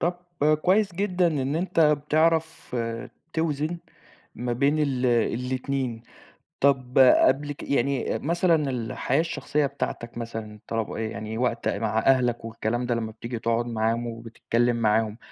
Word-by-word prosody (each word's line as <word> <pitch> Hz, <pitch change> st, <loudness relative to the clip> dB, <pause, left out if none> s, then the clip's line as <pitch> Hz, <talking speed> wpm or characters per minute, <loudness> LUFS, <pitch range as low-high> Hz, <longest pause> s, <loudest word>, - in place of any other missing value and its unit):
طَب 175 Hz, +1 st, 0 dB, 0.5 s
كويس 195 Hz, 0 st, +3 dB
جدًا 185 Hz, -1 st, +1 dB
إن 145 Hz, -2 st, 0 dB
أنت 175 Hz, -1 st, 0 dB
بتعرف 155 Hz, 0 st, +2 dB, 0.6 s
توزن 160 Hz, +1 st, -1 dB, 0.6 s
ما 120 Hz, 0 st, -3 dB
بين 140 Hz, +5 st, +2 dB
ال 130 Hz, -4 st, +1 dB
الاتنين، 125 Hz, +1 st, -1 dB, 0.6 s
طَب 130 Hz, -2 st, +2 dB
قبل 135 Hz, +2 st, +5 dB
ك -, -, -11 dB
يعني 140 Hz, -1 st, 0 dB
مثلًا 165 Hz, -2 st, +1 dB
الحياة 125 Hz, +4 st, -1 dB
الشخصية 150 Hz, -3 st, -1 dB
بتاعتك 120 Hz, -4 st, -5 dB
مثلًا، 110 Hz, -2 st, -6 dB
طلب 115 Hz, -2 st, -2 dB
آآ، -, -, -5 dB
يعني 110 Hz, 0 st, -4 dB
وقت 120 Hz, -1 st, 0 dB
مع 110 Hz, -1 st, 0 dB
أهلك 125 Hz, -1 st, +2 dB
والكلام 115 Hz, +2 st, -2 dB
ده 120 Hz, -, +1 dB
لمّا 110 Hz, -1 st, -3 dB
بتيجي 115 Hz, +2 st, -6 dB
تقعد 115 Hz, +1 st, 0 dB
معاهم 115 Hz, +1 st, 0 dB
وبتتكلم 115 Hz, +1 st, -1 dB
معاهم، 110 Hz, 0 st, +1 dB
125 Hz, 135 wpm, -25 LUFS, 115-150 Hz, 0.6 s, قبل